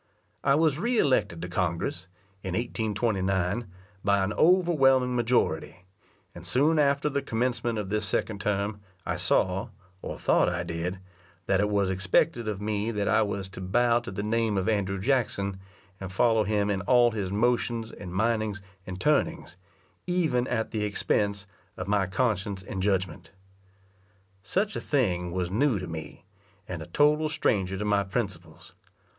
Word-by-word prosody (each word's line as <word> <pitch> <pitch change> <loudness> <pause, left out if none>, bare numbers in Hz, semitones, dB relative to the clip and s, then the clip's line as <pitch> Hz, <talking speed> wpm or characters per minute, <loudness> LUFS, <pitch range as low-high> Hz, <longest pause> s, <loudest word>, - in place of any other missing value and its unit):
I 140 - +4
was 155 -1 +2
re 235 +5 0
elected 130 - +1
to - - -3
Congress, 85 0 -2 0.3
in 95 -2 -4
1829, 105 -3 -1 0.4
by 100 -1 +3
an 100 +3 -1
overwhelming 135 -8 +4
majority; 115 -7 0 0.5
and 85 - -10
soon 145 - +2
after 140 0 +2
the 140 -1 0
commencement 120 -1 -1
of 105 -3 -3
this 105 0 0
second 100 +1 -2
term, 100 0 -1 0.2
I 85 - -1
saw, 90 +2 +1 0.3
or - - -5
thought - - +3
I 90 0 -2
did, 85 +2 -3 0.5
that 95 -1 +2
it 105 +1 +2
was 100 -2 +1
expected 95 +5 +1
of 105 -3 -2
me 105 +1 -1
that 105 -3 -1
I - - +4
was 100 -2 -2
to 95 - -9
bow 120 +5 +2
to 120 - -8
the 100 +2 -4
name 110 -1 0
of 95 +1 -1
Andrew 100 -3 0
Jackson, 100 -5 0 0.4
and 95 -1 -6
follow 110 +1 +3
him 105 -1 +1
in 95 -1 -1
all 120 +4 +4
his 100 -4 -3
motions, 115 +1 0
and 90 -4 -9
mindings, 110 0 0 0.3
and 90 0 -6
turnings, 150 - 0 0.5
even 155 -9 +1
at 110 -2 -1
the 110 -2 -1
expense 100 -1 0 0.3
of 90 - -5
my 100 -2 +2
conscience 100 -2 -1
and 95 0 -5
judgment. 95 -3 -1 1.1
Such 200 - -1
a - - -3
thing 90 - 0
was 90 0 -2
new 125 +2 +2
to 90 - -4
me, 80 -1 -8 0.4
and 90 -3 -5
a 80 - -8
total 150 - +3
stranger 95 -11 0
to 105 - -3
my 100 -1 +2
principles. 95 -6 -5
105 Hz, 160 wpm, -27 LUFS, 95-120 Hz, 1.1 s, I